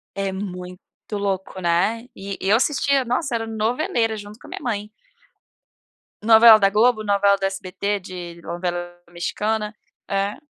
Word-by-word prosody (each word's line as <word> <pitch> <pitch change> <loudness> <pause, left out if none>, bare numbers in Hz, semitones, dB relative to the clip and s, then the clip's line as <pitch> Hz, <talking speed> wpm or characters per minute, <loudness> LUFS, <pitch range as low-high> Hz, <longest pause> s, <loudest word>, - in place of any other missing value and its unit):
É 195 -1 -1
muito 180 -2 -6 0.3
louco, 195 -2 -2
né. 190 +8 +1
E 195 0 -6
eu 200 +3 +3
assistia, 275 0 +2
nossa, 250 +2 -1
era 225 -1 -1
noveleira 225 +1 0
junto 205 +1 -10
com - - -15
a - - -13
minha - - -6
mãe. 210 -3 -3 1.3
Novela 225 0 +9
da 195 -1 +3
Globo, 220 +2 +3
novela 200 -1 +3
do 195 - -5
SBT 195 +1 -2
de 175 -2 -8
novela 175 0 -4
mexicana 210 +5 -2 0.3
é 200 +1 -1
205 Hz, 145 wpm, -22 LUFS, 190-225 Hz, 1.3 s, Novela